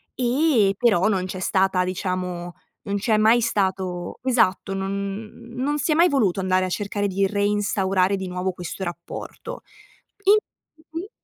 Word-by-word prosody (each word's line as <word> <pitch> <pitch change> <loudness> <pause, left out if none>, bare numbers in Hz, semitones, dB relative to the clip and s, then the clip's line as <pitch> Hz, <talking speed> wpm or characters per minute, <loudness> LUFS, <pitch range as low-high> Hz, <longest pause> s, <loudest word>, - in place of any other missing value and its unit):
ehm, 245 -5 +3
però 215 -6 +3
non 190 -4 +1
c'è 185 0 -5
stata 190 -1 +2
diciamo 180 -1 -3 0.3
non 200 0 -2
c'è 215 +1 +2
mai 220 +3 +5
stato 190 -5 -1
esatto 225 -7 +2
non 195 0 -2 0.3
n 230 +2 -13
non 290 +3 0
si 295 +3 0
è - - +4
mai 340 +3 +6
voluto 215 -10 +2
andare 185 0 +2
a - - -3
cercare 205 +1 -1
di 195 0 +1
reinstaurare 200 -2 +1
di 190 -1 -4
nuovo 180 +1 -2
questo 180 +1 -6
rapporto. 175 - -7 0.6
In 405 +2 +7 0.6
mh-mh. 335 +5 -5
195 Hz, 155 wpm, -23 LUFS, 185-230 Hz, 0.6 s, In